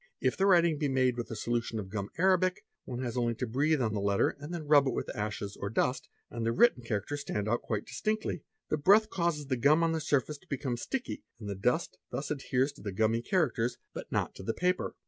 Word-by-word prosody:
If - - +1
the 195 - +2
writing 170 -5 +4
be 150 - +1
made 130 -2 +2
with 120 -1 -4
a 115 - -4
solution 120 +1 -1
of 95 -3 -5
gum 100 -1 -3
arabic, 185 0 +2 0.2
one 125 0 -4
has 120 -2 -3
only 120 -2 +1
to 125 - -2
breathe 140 +5 +1
on 110 -2 0
the 105 - -1
letter 100 0 +2
and 145 +3 -7
then 170 -3 -4
rub 145 -2 +5
it 130 - 0
with - - -4
ashes 105 -1 -3
or 100 - -4
dust, 125 +4 0 0.2
and 115 -1 -4
the 115 - +1
written 185 - +4
characters 115 +5 -3
stand 105 -7 -3
out 120 +2 +1
quite 105 -2 -3
distinctly. 215 -6 -2 0.3
The 155 - +1
breath 210 +7 +5
causes 170 -5 0
the 130 -2 -1
gum 150 +7 +4
on 165 - +2
the 160 -1 -1
surface 145 0 0
to - - -25
become 130 -3 -2
sticky, 250 - -4 0.2
and 105 - -7
the 100 - -2
dust 125 - 0
thus 145 - -4
adheres 135 -1 0
to 145 - -16
the 100 - -4
gummy 110 +4 +1
characters 125 -5 0 0.2
but - - -8
not - - 0
to - - -10
the 110 +4 -2
paper. 180 +1 0
130 Hz, 240 wpm, -30 LUFS, 115-160 Hz, 0.3 s, rub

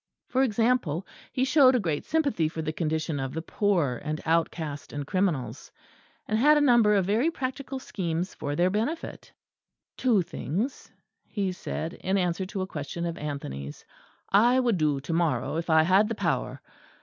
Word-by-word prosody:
For 260 - +2
example, 225 - +1 0.3
he 260 - +1
showed 265 -2 +6
a - - +3
great 160 -8 -2
sympathy 280 - +1
for 160 0 -5
the 155 0 -2
condition 155 -1 -1
of 135 +1 -4
the 160 - -2
poor 170 - 0
and 155 +1 -3
outcast 160 -3 -1
and 145 -1 -4
criminals; 180 -6 -1 0.6
and 215 +1 +1
had 300 +4 +6
a 290 -1 +3
number 230 -4 +5
of 195 -2 +2
very 225 - +2
practical 270 -2 -4
schemes 180 -7 -3
for 145 0 -4
their 180 +3 +2
benefit. 230 - -3 0.7
"Two 225 -8 +3
things," 205 - -4 0.4
he 200 -3 -2
said, 170 -2 -5
in 190 +1 -1
answer 180 0 -1
to 195 -1 -3
a - - -2
question 170 0 -5
of 170 -1 -3
Anthony's, 75 - -6 0.4
"I 240 +6 +5
would 240 -6 +2
do 150 -3 +1
to 150 +4 -4
morrow 165 -1 0
if 165 +1 -4
I 160 0 +6
had 190 +5 +4
the 230 - -2
power. - - -2
185 Hz, 175 wpm, -27 LUFS, 155-230 Hz, 0.7 s, showed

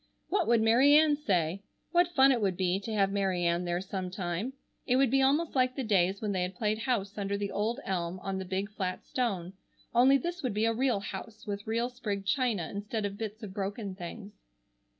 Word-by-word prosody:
What 405 - +1
would 230 -1 +4
Mary 255 +6 +6
Ann 305 -1 +6
say? 185 - 0 0.3
What 350 0 +2
fun 270 0 +7
it 245 -4 +1
would 190 -3 0
be 185 0 +1
to 210 +3 -6
have 200 -2 +2
Mary 190 -3 0
Ann 170 +1 +1
there 175 0 -1
sometime. 185 +3 -4 0.3
It 250 - +3
would 265 -2 +3
be 270 0 +4
almost 290 +5 +2
like 255 -1 +2
the 270 - -2
days 195 -2 +1
when 210 - 0
they 185 -2 0
had 180 +1 -3
played 215 +2 0
house 220 -5 -1
under 200 0 -1
the 200 -1 -3
old 225 +5 -1
elm 180 -1 -2
on 195 0 -3
the - - -3
big 190 +3 -3
flat 185 -3 -4
stone, 195 -8 -2 0.4
only 255 +3 +6
this 345 +6 -4
would 250 -7 -2
be 215 +1 +2
a 230 - +2
real 245 -3 +1
house 200 +3 -8
with 205 -1 -5
real 230 +2 0
sprigged 215 -6 -4
china 225 - +1
instead 205 +1 -3
of 200 0 -5
bits 220 0 -5
of 195 -3 -7
broken 200 +1 -4
things. 195 +3 -8
205 Hz, 215 wpm, -30 LUFS, 190-245 Hz, 0.4 s, fun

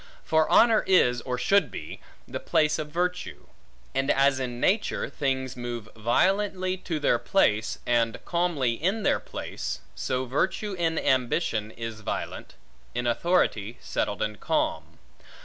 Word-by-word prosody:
For 160 0 +2
honor 230 -2 +5
is, 125 -10 +4
or 125 0 -3
should 195 +4 +3
be, 75 - -8 0.3
the - - -5
place 155 0 +2
of 150 -1 -4
virtue; 180 +3 -2 0.5
and 135 +1 0
as 135 0 +3
in 125 -2 -4
nature, 210 - +1
things 130 -3 -1
move 120 -3 -5
violently 185 - +1
to 170 -4 -3
their 145 - +2
place, 110 - +2
and 115 -1 +2
calmly 170 -8 +1
in 190 - -1
their - - +3
place, - - -5
so 130 0 -2
virtue 190 - -1
in 165 -3 0
ambition 125 -4 +1
is 115 -1 -6
violent, - - -5 0.4
in 120 0 -1
authority 120 - +1
settled 105 -1 -2
and 105 -1 -4
calm. - - -1
135 Hz, 140 wpm, -27 LUFS, 120-180 Hz, 0.5 s, honor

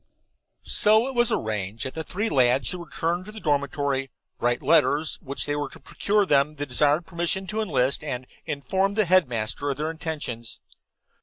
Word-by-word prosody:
So 220 +2 +4
it 270 - -4
was 240 -2 +3
arranged 105 +1 -2
that 130 - -4
the 160 - -4
three 205 +7 -2
lads 130 - +3
should 180 - -4
return 170 +1 -2
to 210 - -10
the 215 - -8
dormitory, 140 -3 0 0.3
write 120 0 +1
the - - -13
letters 150 +2 +3
which 140 +1 -3
were 145 -1 -2
to - - -14
procure 205 0 0
them 145 -2 +2
the 145 0 -3
desired 145 +5 +2
permission 170 +3 -1
to 215 +3 -2
enlist, 140 -10 +1
and 130 -4 -3
then 150 +3 -6
inform 190 +9 0
the 215 -1 +3
headmaster 145 -7 +1
of 140 - -2
their 155 +2 -2
intentions. 145 -8 -5
150 Hz, 180 wpm, -25 LUFS, 135-180 Hz, 0.3 s, So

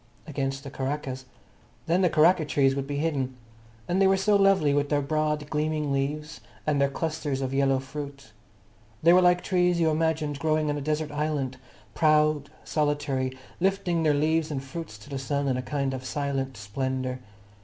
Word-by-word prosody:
Against 135 -2 -3
the 140 - -8
karakas. 135 -1 -4 0.6
Then 175 +3 +2
the 180 - +4
karaka 160 +2 +4
trees 135 -2 +2
would 135 -1 -3
be 145 - -3
hidden. 140 -5 -1 0.5
And 185 +2 +1
they 195 - +6
were 190 0 +4
so 205 +2 +3
lovely, 195 -7 +4
with 145 0 +1
their 145 - +2
broad, 150 0 0
gleaming 150 -1 0
leaves, 145 0 -2 0.2
and 145 -2 +1
their 140 - +3
clusters 155 -2 -2
of 135 -1 -2
yellow 135 -1 +3
fruit. 140 -2 -7 0.7
They 170 +2 +7
were 180 - +6
like 180 0 +4
trees 180 -2 +2
you 160 -1 +3
imagined 155 -2 0
growing 155 0 +1
on 145 - -2
a - - -6
desert 150 +1 -1
island, 145 -3 -2 0.4
proud, 155 -2 +3
solitary, 145 -4 -1 0.2
lifting 185 -2 +1
their 155 -2 +3
leaves 160 +2 +1
and 135 -3 -3
fruits 135 -4 -7
to 105 - -15
the 135 - -3
sun 140 +1 -1
in 130 - +1
a 125 - -1
kind 140 0 -2
of 130 -1 -5
silent 135 -2 -2
splendour. 130 +5 -3
145 Hz, 180 wpm, -27 LUFS, 135-160 Hz, 0.7 s, They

